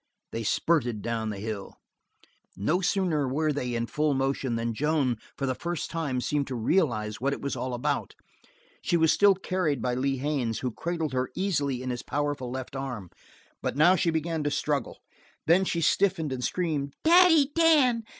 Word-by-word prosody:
They 115 - -3
spurted 120 -2 0
down 115 -1 -2
the 105 - -4
hill. 105 -1 -5 0.8
No 155 - +1
sooner 175 -7 +1
were 150 +3 0
they 125 -4 -2
in 115 0 -1
full 150 +3 0
motion 135 -2 -1
than 115 0 -2
Joan, 140 -2 +1 0.2
for 135 - -2
the 130 - 0
first 170 +5 -4
time, 145 -6 -2
seemed 145 +2 -1
to 130 - -4
realize 115 - 0
what 140 +2 +1
it - - -5
was 140 - -2
all 130 -1 -3
about. 120 - -2 0.7
She 175 -6 +1
was 160 -1 +4
still 200 -1 +5
carried 180 -7 -1
by 125 0 -1
Lee 135 +2 0
Haines, 130 -5 -1
who 125 - -2
cradled 165 +2 -3
her 130 0 -1
easily 145 -9 -1
in 130 - -2
his 120 -1 -4
powerful 145 -3 -2
left 130 +1 -6
arm, 125 -9 -5 0.5
but - - -3
now 175 +5 +6
she 175 -1 +1
began 160 0 -1
to 145 - 0
struggle. 145 -3 -2 0.5
Then 180 +4 +4
she 170 -2 -1
stiffened 165 -3 +2
and 125 -1 -4
screamed: 150 -4 -2
"Daddy 325 -4 +6
Dan! 295 -8 +4
145 Hz, 180 wpm, -27 LUFS, 125-170 Hz, 0.8 s, now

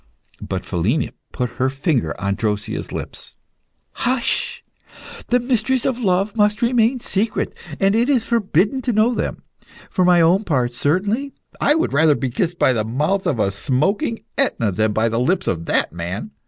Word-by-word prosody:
But - - -4
Philina 100 - 0 0.2
put 125 -2 -2
her 130 - +3
finger 135 - -1
on 100 0 0
Drosea's 105 -1 -3
lips. - - -7 0.6
"Hush! 250 0 -1 0.6
the 245 - +3
mysteries 245 0 0
of 255 -2 0
love 195 -1 +1
must 210 +2 +2
remain 240 +1 +2
secret, 215 -1 -1 0.2
and 195 +1 +3
it 235 +4 +2
is 250 -6 +2
forbidden 215 - +1
to 250 -2 -1
know 220 +3 +3
them. - - -3 0.5
For 185 - +1
my 180 -1 +5
own 175 +5 +4
part, 125 - 0
certainly, 200 - 0 0.2
I 295 - +3
would 320 - 0
rather 155 +1 +4
be 130 -3 -2
kissed 175 +6 -1
by 130 - +3
the 110 -3 0
mouth 150 - -1
of 110 - 0
smoking 195 - 0 0.2
Etna 115 - +1
than 110 +3 +1
by 110 +2 +1
the 115 +1 -1
lips 175 +9 +1
of 85 -2 -2
that - - +1
man. 90 - -5
180 Hz, 170 wpm, -20 LUFS, -, 0.6 s, my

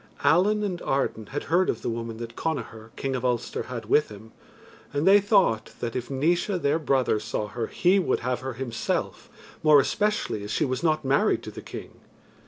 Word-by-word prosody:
Allen 210 +6 +4
and 185 -4 -3
Arden 125 -5 -1
had 145 - -4
heard 180 +3 +2
of 115 - -2
the - - -1
woman 115 -1 -5
that 115 0 -7
Connachar, 115 -8 -4
King 135 -1 -2
of 125 - -3
Ulster, 120 -2 -1
had 125 -2 -5
with 150 - +3
him, 110 +1 -12 0.6
and 145 +2 -1
they 200 +1 +8
thought 190 - +2
that, 115 -1 -4
if 125 -1 -3
Naois, 170 +8 +1
their 150 +1 +1
brother, 130 -7 +1
saw 105 0 -3
her, 115 0 -3
he 185 +3 +3
would 185 - 0
have 125 +1 -1
her 130 0 -5
himself, 120 -1 -3 0.3
more 155 -2 +7
especially 205 - 0
as 105 - -7
she - - +1
was 130 -1 -2
not 155 -3 +1
married 135 +1 +2
to - - -7
the - - -9
King. - - -10
135 Hz, 195 wpm, -26 LUFS, 115-165 Hz, 0.6 s, they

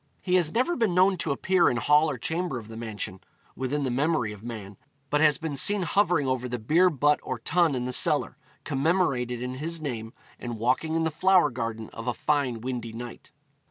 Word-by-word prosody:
He 180 - -3
has 175 -4 +3
never 255 - +1
been 220 - 0
known 185 +1 +4
to 165 -3 -2
appear 180 +5 +2
in 120 - -1
hall 150 +6 +4
or 140 - -3
chamber 165 +2 -2
of 110 -2 -9
the 110 - -9
mansion, 105 -4 -5 0.4
within 135 +3 -2
the 130 - -1
memory 135 -4 0
of 100 - -13
man, 110 -4 -8 0.4
but 150 0 +2
has 150 -2 +5
been 160 -3 -4
seen 200 +8 +3
hovering 175 -4 +2
over 130 -1 -1
the 125 - -3
beer 160 +11 +3
butt 150 -1 +2
or 130 - -4
tun 165 +4 +1
in 125 -1 -2
the 125 - -2
cellar, - - +2 0.3
commemorated 135 -5 0
in 125 0 -4
his 165 +1 -2
name, 115 -7 -5 0.3
and 120 -2 -5
walking 130 +8 0
in 165 - +1
the 160 - 0
flower 185 +2 +3
garden 115 -2 -5
of 115 +2 -8
a 125 - 0
fine 140 -6 0
windy 120 -2 -4
night. 120 +1 -9
140 Hz, 210 wpm, -26 LUFS, 120-165 Hz, 0.4 s, has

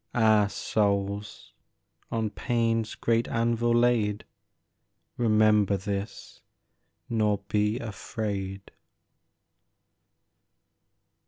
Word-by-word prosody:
Ah 110 -3 +4
souls, 100 -1 -2 0.6
on 110 -2 -1
pain's 115 -2 -1
great 115 0 +1
anvil 115 0 0
laid, 115 -3 +2 0.9
Remember 105 -3 +3
this, 100 +1 -6 0.7
nor 105 -3 +1
be 105 +2 +1
afraid 100 -4 -5
110 Hz, 65 wpm, -27 LUFS, 100-115 Hz, 0.9 s, Ah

